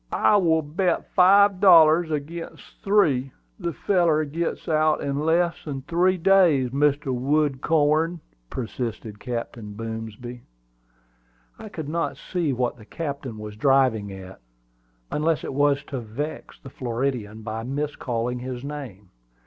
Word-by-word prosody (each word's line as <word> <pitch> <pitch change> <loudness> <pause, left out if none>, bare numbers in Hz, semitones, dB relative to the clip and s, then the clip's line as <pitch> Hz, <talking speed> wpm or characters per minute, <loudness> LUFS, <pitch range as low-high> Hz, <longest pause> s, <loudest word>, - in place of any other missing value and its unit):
"I 210 - +4
will 160 -4 +2
bet 170 +4 -1
five 195 +1 +5
dollars 165 -3 +6
agin 155 +3 -5 0.2
three 145 -11 +2 0.3
the 170 -3 -2
feller 165 -3 +1
gits 165 +4 -4
out 155 -1 +2
in 140 0 -2
less 170 +2 +1
than 135 -3 -5
three 175 +4 +2
days, 165 -9 +4
Mr. 140 0 +1
Woodcorn," 150 +4 +1 0.3
persisted 115 -3 -5
Captain 115 -3 -5
Boomsby. 115 +2 -7 1.2
I 215 - -9
could 160 -7 -6
not 165 +2 -2
see 175 -5 -2
what 125 -1 -1
the 110 - -14
captain 140 -5 -5
was 105 0 -8
driving 125 -4 +2
at, 95 0 -10 0.7
unless 160 +1 0
it - - -5
was 145 0 +2
to 135 - -5
vex 125 +7 -6
the 135 - -12
Floridian 120 -4 -3
by 110 0 -4
miscalling 125 -2 -3
his 125 0 -6
name. 130 -10 -8
140 Hz, 130 wpm, -24 LUFS, 120-165 Hz, 1.2 s, dollars